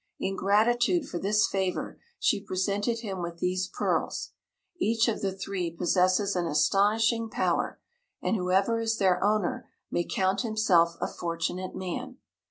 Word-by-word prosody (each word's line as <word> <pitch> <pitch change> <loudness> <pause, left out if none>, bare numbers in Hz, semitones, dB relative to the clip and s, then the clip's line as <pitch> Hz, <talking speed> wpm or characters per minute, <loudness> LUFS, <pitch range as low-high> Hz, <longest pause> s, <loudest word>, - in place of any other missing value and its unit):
In 195 0 -2
gratitude 240 - +2
for 175 - -4
this 210 +3 +3
favor 190 -2 -2 0.2
she - - +1
presented 205 +5 -1
him 195 -5 -4
with 170 0 -5
these 180 +1 -1
pearls. - - -2 0.5
Each 225 +2 +2
of 230 - -1
the 195 - 0
three 190 -2 -3
possesses 185 +4 +1
an 175 -1 0
astonishing 210 +9 +2
power, - - -1 0.4
and - - 0
whoever 195 +4 +1
is 225 0 0
their 190 -3 +2
owner 210 -3 0 0.2
may 175 - +1
count 190 +2 0
himself 215 -8 +3
a - - -1
fortunate 175 +2 -3
man. 185 -2 -5
195 Hz, 145 wpm, -28 LUFS, 180-215 Hz, 0.5 s, this